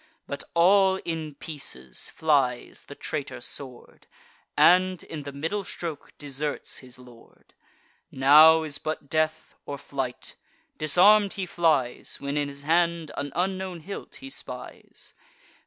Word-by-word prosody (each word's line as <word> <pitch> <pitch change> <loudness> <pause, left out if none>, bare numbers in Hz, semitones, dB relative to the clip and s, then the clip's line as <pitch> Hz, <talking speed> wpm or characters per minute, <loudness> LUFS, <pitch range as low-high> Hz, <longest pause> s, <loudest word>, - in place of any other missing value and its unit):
But - - -5
all 190 +2 +5
in 160 -3 -4
pieces 65 - -6
flies 140 -6 0
the 145 - -10
traitor 145 -4 -5
sword, 125 0 -8 0.5
And, 185 0 +5
in 155 - -7
the 140 0 -7
middle 165 +9 -3
stroke, 165 -5 -6
deserts 145 0 -4
his 125 -1 -11
lord. 125 -2 -18 0.6
Now 155 +4 +7
is 150 -2 -3
but 155 -2 -5
death, 155 0 0
or 145 - -6
flight; 135 -3 -5 0.4
disarm'd 195 +7 +5
he 195 -3 -3
flies, 155 -8 0
When 140 +1 -3
in 145 -1 0
his 140 0 -10
hand 170 0 +1
an 140 0 -4
unknown 185 -1 -2
hilt 200 +5 -8
he 270 0 -10
spies. - - -9
155 Hz, 130 wpm, -26 LUFS, 140-175 Hz, 0.6 s, Now